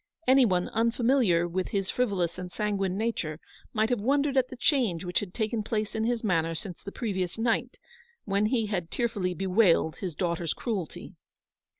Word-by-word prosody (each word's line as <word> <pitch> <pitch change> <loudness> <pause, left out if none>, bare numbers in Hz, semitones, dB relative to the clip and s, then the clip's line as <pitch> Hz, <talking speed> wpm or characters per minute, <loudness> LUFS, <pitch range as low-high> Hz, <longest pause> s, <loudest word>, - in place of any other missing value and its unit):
Any 260 0 +6
one 180 -4 +1
unfamiliar 230 -6 +2
with 180 +2 -2
his 195 -2 -1
frivolous 190 -8 0
and 180 -1 -6
sanguine 195 -3 -1
nature, 190 -9 -2 0.3
might 220 +2 +1
have 240 -4 +1
wondered 280 +4 +2
at 260 -1 +3
the 255 - -9
change 240 - +1
which 180 0 0
had 200 -3 -6
taken 220 +2 -1
place 215 0 -2
in 220 0 -1
his 240 0 0
manner 165 -5 +1
since 180 0 -6
the 200 - -7
previous 190 -6 -2
night, 235 +2 0 0.5
when 200 +1 +2
he 230 -1 +1
had 180 -5 -2
tearfully 205 -7 -1
bewailed 185 -3 +3
his 180 -5 -5
daughter's 170 -2 -1
cruelty. 200 -9 -4
205 Hz, 175 wpm, -28 LUFS, 180-235 Hz, 0.5 s, Any